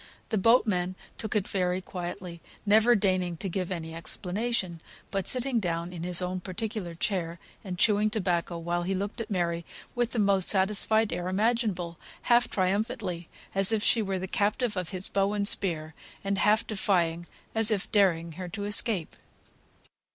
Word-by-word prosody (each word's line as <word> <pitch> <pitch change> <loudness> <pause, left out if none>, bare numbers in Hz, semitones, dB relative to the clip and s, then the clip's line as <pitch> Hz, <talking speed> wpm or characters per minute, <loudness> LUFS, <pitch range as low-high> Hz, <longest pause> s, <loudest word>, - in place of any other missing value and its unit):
The 220 - 0
boatman 185 -5 +2 0.2
took 220 - -4
it 205 -2 +1
very 180 -1 -1
quietly, 175 -1 -7 0.2
never 220 +4 +5
deigning 185 -4 0
to 195 - -4
give 185 0 -3
any 160 -3 -5
explanation, 180 +1 -2 0.3
but 195 -2 -2
sitting 255 -1 0
down 170 -2 -3
in 170 - -7
his 180 +1 0
own 180 +1 -3
particular 195 -1 -5
chair, 170 -1 -2 0.3
and 185 -3 -6
chewing 210 +2 +3
tobacco, 180 -5 -1
while 170 +1 -2
he 190 +2 -2
looked 200 +4 -4
at 220 - -6
Mary 170 -3 -1 0.3
with 240 -2 -1
the - - -5
most 200 -3 +4
satisfied 210 +2 +3
air 175 - -3
imaginable, 195 -4 -1 0.2
half 240 0 +3
triumphantly, 190 -2 -2 0.2
as 195 +1 +5
if 215 -2 0
she 230 - +3
were 195 -2 -2
the 185 +1 -4
captive 210 +4 0
of 180 -3 -3
his 185 0 +4
bow 200 +1 0
and 200 -1 +1
spear, 160 -6 +2 0.3
and 195 0 -1
half 215 +2 +3
defyingly, 175 -5 0 0.3
as 225 -1 +4
if 210 -3 -2
daring 170 -5 +2
her 180 -1 -6
to 205 +3 -5
escape. 205 -4 +3
190 Hz, 165 wpm, -28 LUFS, 175-215 Hz, 0.3 s, never